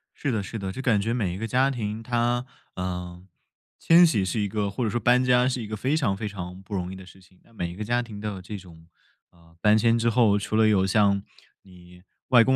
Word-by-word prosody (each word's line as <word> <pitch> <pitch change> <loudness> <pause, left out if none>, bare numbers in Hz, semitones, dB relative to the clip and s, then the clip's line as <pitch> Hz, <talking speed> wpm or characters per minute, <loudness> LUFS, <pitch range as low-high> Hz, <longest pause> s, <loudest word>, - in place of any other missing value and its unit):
是 140 - -2
的 110 -3 -1
是 110 - -6
的， 95 -1 -4
就 130 - -6
感 110 -6 +2
觉 115 +3 -1
每 105 -8 -1
一 95 - -6
个 115 +2 -4
家 130 +3 +2
庭 110 -3 -4
它， 120 +1 0 0.3
嗯， 90 0 -5 0.5
迁 170 +1 +6
徙 110 - +2
是 95 +4 -2
一 105 - 0
个、 100 0 -2
或 100 +6 -3
者 110 - 0
说 120 +3 -1
搬 125 +3 +3
家 125 0 +4
是 125 -2 -3
一 105 - -7
个 110 - -4
非 135 +8 0
常 110 -11 +1
非 105 +2 -4
常 90 -2 -7
不 100 +2 -11
容 90 -1 -3
易 - - -7
的 95 -1 -11
事 90 +1 -16
情。 95 0 -24
那 - - -25
每 85 -5 -4
一 - - -10
个 105 - -5
家 120 +3 0
庭 110 -4 -9
都 105 - -3
有 95 -2 -7
这 105 +3 -7
种， 85 -3 -15 0.4
呃， 85 -1 -23
搬 105 0 +5
迁 115 +1 +3
之 115 0 +1
后， 110 -3 +3
除 105 +1 -3
了 110 0 +5
有 95 -3 +3
像 100 0 +2 0.4
你 90 -1 -17 0.3
外 120 -3 +7
公 130 +2 +2
105 Hz, 280 characters per minute, -25 LUFS, 95-120 Hz, 0.5 s, 外